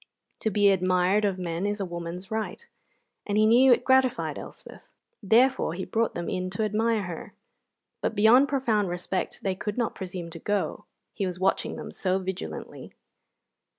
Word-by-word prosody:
To 220 - 0
be 205 -1 +4
admired 185 +2 +2
of 195 -2 0
men 175 +1 -2
is 205 +1 -2
a 195 - -1
woman's 175 +3 -7
right, 220 - -4 0.6
and 205 0 0
he 215 - +5
knew 250 +4 +6
it 245 - +4
gratified 260 -1 +2
Elspeth; - - -12 0.3
therefore 225 -4 +3
he 190 - -4
brought 230 0 0
them 170 0 -4
in 185 -1 -2
to 220 - +1
admire 215 +1 +1
her. 175 -3 -7 0.7
But - - -1
beyond 230 +6 +6
profound 230 -8 +1
respect 180 +1 -3
they 195 - 0
could 205 +3 -5
not 235 -2 0
presume 180 -2 -6
to 165 - -8
go, 205 +4 -2 0.3
he 200 -3 -2
was 180 0 -5
watching 190 - 0
them - - -7
so 185 -1 0
vigilantly. 190 -1 -6
200 Hz, 170 wpm, -26 LUFS, 185-220 Hz, 0.7 s, knew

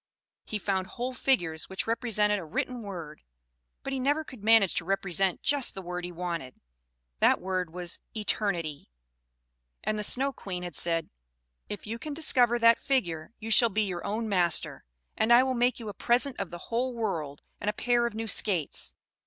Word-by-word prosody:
He 215 - -2
found 190 -1 -1
whole 250 +5 -4
figures 175 - 0
which 190 - -3
represented 215 -3 +1
a - - -6
written 240 +10 -3
word; 170 -7 -7 0.6
but 275 - -3
he 265 - -1
never 290 +4 +1
could 255 -8 -12
manage 220 -4 +5
to - - +1
represent 195 0 0
just 285 -6 +2
the 190 - -5
word 180 0 -4
he 180 - -6
wanted 170 -7 -5 0.6
that - - +5
word 185 -2 -2
was 175 0 -3 0.2
"eternity"; 175 - -1 0.9
and 215 0 -1
the - - -1
Snow 270 +6 +2
Queen 180 -6 -5
had 175 -2 -5
said, 165 0 -1 0.6
"If 205 - -5
you 225 +2 -4
can 300 +1 -5
discover 250 -6 +3
that 230 -1 +6
figure, 170 - -1
you 225 0 -5
shall 235 +1 +6
be 215 +1 +1
your 180 -4 -3
own 220 +3 -2
master, 180 -5 +1 0.3
and 220 +2 +2
I 240 +2 +8
will 260 0 0
make 245 0 +2
you 225 - -7
a 205 - -4
present 250 +6 +1
of 195 - -3
the 175 - -7
whole 245 +2 0
world 160 -11 -3 0.2
and 205 - -1
a - - 0
pair 240 +2 +2
of 230 - -7
new 225 0 -3
skates." 185 -6 0
210 Hz, 185 wpm, -29 LUFS, 180-240 Hz, 0.9 s, I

